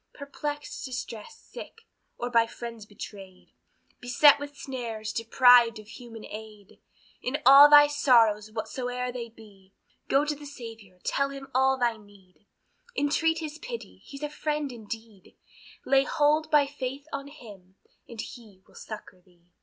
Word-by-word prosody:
Perplexed, 290 +1 -6
distressed, 255 - -8
sick, 460 -2 -10 0.4
or 245 +1 -4
by 230 -1 +4
friends 230 -2 -9
betrayed, 195 -3 -11 0.5
Beset 285 +4 +5
with 285 0 -8
snares, 225 -5 -5
deprived 235 0 +5
of 215 0 -13
human 230 -1 -11
aid, 215 -2 -11 0.4
In 255 +4 -2
all 275 +3 +10
thy 290 0 +9
sorrows 230 -8 +3
whatsoe'er 250 +3 -4
they 240 -2 -6
be, 205 -4 -18 0.3
Go 275 +2 +3
to 300 - -1
the 290 0 -11
Saviour, 225 -8 -11
tell 275 0 0
him 275 -1 -9
all 265 +1 +3
thy 240 -3 0
need, 205 -2 -21 0.5
Entreat 325 +3 +1
his 310 0 -6
pity, 485 -2 -8
he's 280 +1 -10
a 295 - -2
friend 300 -2 -2
indeed; 220 -3 -10 0.5
Lay 270 0 +4
hold 300 +2 +1
by 295 -2 +5
faith 275 0 -6
on 275 0 -4
Him, 205 -10 -14 0.3
and 230 - -10
he 210 -6 -12
will - - -24
succor 210 -4 -10
thee. 175 -1 -29
245 Hz, 145 wpm, -27 LUFS, 215-285 Hz, 0.5 s, all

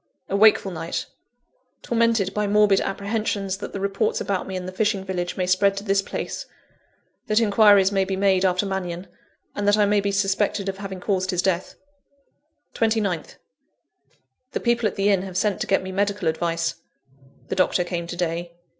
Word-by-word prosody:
A 195 - -1
wakeful 205 -1 +5
night 165 -1 -4 0.8
tormented 230 -4 +1
by 210 0 0
morbid 205 -1 +4
apprehensions 200 -1 -2
that 205 - -7
the 200 - -5
reports 200 +2 0
about 195 -2 -2
me 190 - -5
in 185 -1 -4
the 185 - -5
fishing 200 0 0
village 180 -2 -3
may 185 - 0
spread 195 +2 +2
to 200 - -4
this 195 -1 +2
place; - - -5 0.8
that 215 +1 +3
inquiries 205 -3 +5
may 195 -1 +2
be 190 0 -2
made 190 -1 +2
after 185 +1 +2
Mannion; 185 -2 -4 0.5
and 205 0 -2
that 205 +1 +4
I 210 - +4
may 205 0 +2
be 200 0 -1
suspected 200 0 0
of 195 0 -3
having 195 -2 -6
caused 185 -2 -1
his 180 -1 0
death. 185 -2 -1 1.0
29th. 220 -7 -1 1.2
The - - -1
people 235 -2 +1
at 205 - -5
the 200 +1 +1
inn 195 -3 +3
have 185 -1 -6
sent 205 -2 0
to - - -2
get 195 - +2
me 190 - -6
medical 200 -2 -1
advice. 165 +1 -1 0.7
The - - -1
doctor 185 -1 +2
came 175 -1 -4
to 175 - -5
day. 170 0 -2
195 Hz, 180 wpm, -23 LUFS, 185-205 Hz, 1.2 s, wakeful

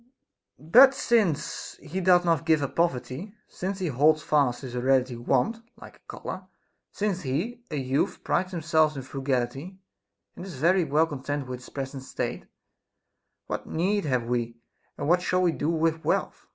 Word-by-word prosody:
But 245 - +7
since 210 - 0
he 180 +6 -5
doth 180 -1 +4
not 165 -2 +2
give 160 -3 +2
up 140 - -4
poverty, 165 - -1
since 190 +2 -4
he 190 - -3
holds 155 +1 +3
fast 135 -5 +2
his 130 -3 -7
hereditary 130 0 +1
want, 135 - 0 0.2
like - - -13
a - - -34
color, - - -7 0.4
since 200 -3 -2
he, 175 - -3
a 155 - -4
youth, 135 0 -1
prides 185 0 0
himself 160 -3 +2
in 135 - -5
frugality, 135 +5 -3 0.6
and 175 - -8
is 185 -4 -8
very 175 +5 +3
well 155 +2 +3
content 145 -2 -4
with 125 -1 -6
his 125 - -13
present 135 -1 -5
state, 130 - -4 1.0
what - - -5
need 195 +3 0
have 130 -4 +1
we, 120 -1 -2 0.4
and - - -3
what 175 +2 +4
shall 180 0 +1
we 175 - +3
do 155 -1 -2
with 160 0 0
wealth - - -1
155 Hz, 165 wpm, -26 LUFS, 130-180 Hz, 1.0 s, But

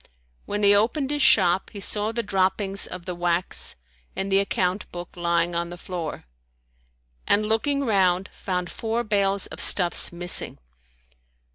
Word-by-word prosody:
When 205 0 -3
he 200 0 +6
opened 255 +7 +1
his 295 0 -1
shop, 185 -6 +3
he 205 - -9
saw 210 +2 0
the 235 0 -3
droppings 195 0 0
of 180 -1 -9
the 180 - -4
wax 175 0 +1 0.4
and 195 +1 -3
the 195 - +4
account 190 -1 -1
book 175 0 -7
lying 170 0 0
on 170 0 -2
the 175 - -9
floor, 175 - -6 1.0
and 210 +1 +3
looking 275 +6 0
round, 190 -4 +2
found 180 -2 -4
four 230 +1 -2
bales 200 -2 +1
of - - -7
stuffs 175 -3 +4
missing. 175 +1 0
195 Hz, 150 wpm, -24 LUFS, 175-210 Hz, 1.0 s, he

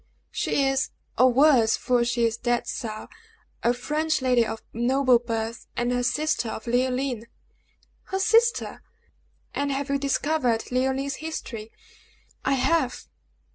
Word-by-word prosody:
"She 280 - 0
is, 270 0 +1 0.3
or 255 0 +5
was 255 -4 +5
(for 245 -1 +1
she 235 0 +1
is 225 -1 0
dead 240 0 -1 0.2
now) 215 -1 -6 0.5
a 235 - +3
French 305 +5 -1
lady, 250 -2 +3
of 225 0 -5
noble 255 +1 +3
birth, 230 -1 -4
and 240 +1 0
the 245 0 0
sister 295 -2 0
of 220 - -6
Leoline!" 250 -1 0 0.8
"Her 385 - -3
sister! 455 +3 +2 0.7
And 285 0 -1
have 275 +1 -2
you 280 - +1
discovered 275 -4 0
Leoline's 265 +2 0
history?" 235 -9 -6 0.7
"I 275 - +2
have." 265 0 +1
255 Hz, 135 wpm, -25 LUFS, 235-280 Hz, 0.8 s, or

